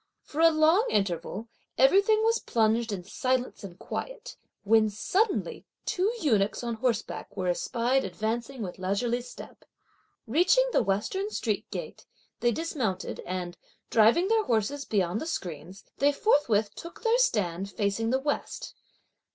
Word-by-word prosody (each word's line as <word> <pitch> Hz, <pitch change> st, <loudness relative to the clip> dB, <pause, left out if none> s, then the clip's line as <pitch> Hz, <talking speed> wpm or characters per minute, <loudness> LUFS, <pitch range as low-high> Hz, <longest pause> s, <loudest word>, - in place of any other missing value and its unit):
For 300 Hz, -, -3 dB
a 330 Hz, -, +8 dB
long 325 Hz, +8 st, +4 dB
interval, 195 Hz, +2 st, -1 dB, 0.3 s
everything 400 Hz, -, +5 dB
was 455 Hz, +1 st, +3 dB
plunged 225 Hz, 0 st, +1 dB
in 190 Hz, -3 st, -4 dB
silence 255 Hz, +5 st, -2 dB
and 185 Hz, -3 st, -9 dB
quiet; -, -, -6 dB, 0.3 s
when 215 Hz, +1 st, +4 dB
suddenly 385 Hz, -, -1 dB, 0.2 s
two 405 Hz, 0 st, +1 dB
eunuchs 220 Hz, -, +1 dB
on 235 Hz, -1 st, -2 dB
horseback 230 Hz, -1 st, -3 dB
were 185 Hz, -1 st, 0 dB
espied 240 Hz, +8 st, 0 dB
advancing 235 Hz, +3 st, -3 dB
with 180 Hz, -2 st, -7 dB
leisurely 230 Hz, +6 st, 0 dB
step. 245 Hz, -, -12 dB, 0.6 s
Reaching 355 Hz, -, +4 dB
the -, -, +3 dB
western 215 Hz, -, -1 dB
street -, -, -2 dB
gate, -, -, -7 dB, 0.3 s
they 240 Hz, -, +2 dB
dismounted, 250 Hz, -, -3 dB
and, 180 Hz, -1 st, -4 dB, 0.3 s
driving 230 Hz, -, +5 dB
their 445 Hz, 0 st, +2 dB
horses 240 Hz, +6 st, 0 dB
beyond 195 Hz, -1 st, 0 dB
the 315 Hz, -, -4 dB
screens, 180 Hz, -, -6 dB, 0.2 s
they 285 Hz, +1 st, +4 dB
forthwith 235 Hz, -, +2 dB
took 335 Hz, +6 st, -10 dB
their 465 Hz, +1 st, +3 dB
stand 195 Hz, -, +1 dB
facing 205 Hz, +2 st, -1 dB
the 260 Hz, -, +2 dB
west. 285 Hz, +2 st, -3 dB
235 Hz, 140 wpm, -28 LUFS, 200-325 Hz, 0.6 s, a